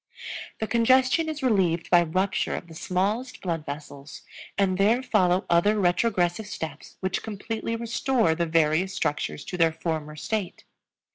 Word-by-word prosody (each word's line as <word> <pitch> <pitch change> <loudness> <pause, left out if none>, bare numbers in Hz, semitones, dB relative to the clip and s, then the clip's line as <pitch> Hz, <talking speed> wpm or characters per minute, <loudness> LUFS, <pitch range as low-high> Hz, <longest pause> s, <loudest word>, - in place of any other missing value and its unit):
The 220 - -2
congestion 255 +7 +3
is 300 -2 -5
relieved 185 -9 +1
by 175 -1 +7
rupture 185 +4 0
of - - -6
the 165 - -13
smallest 200 +10 -2
blood 165 -4 -3
vessels, 145 0 -8 0.3
and 190 -1 +1
there 225 +6 +3
follow 185 -7 +2
other 205 +5 +3
retrogressive 180 +1 +1
steps 160 -7 -7
which 185 -1 -1
completely 225 +2 -4
restore 235 -4 +1
the 170 +1 -1
various 165 +4 +2
structures 150 -6 -2
to 180 - -5
their 165 -1 +4
former 160 -2 -4
state. 200 +4 -3
185 Hz, 145 wpm, -26 LUFS, 165-220 Hz, 0.3 s, by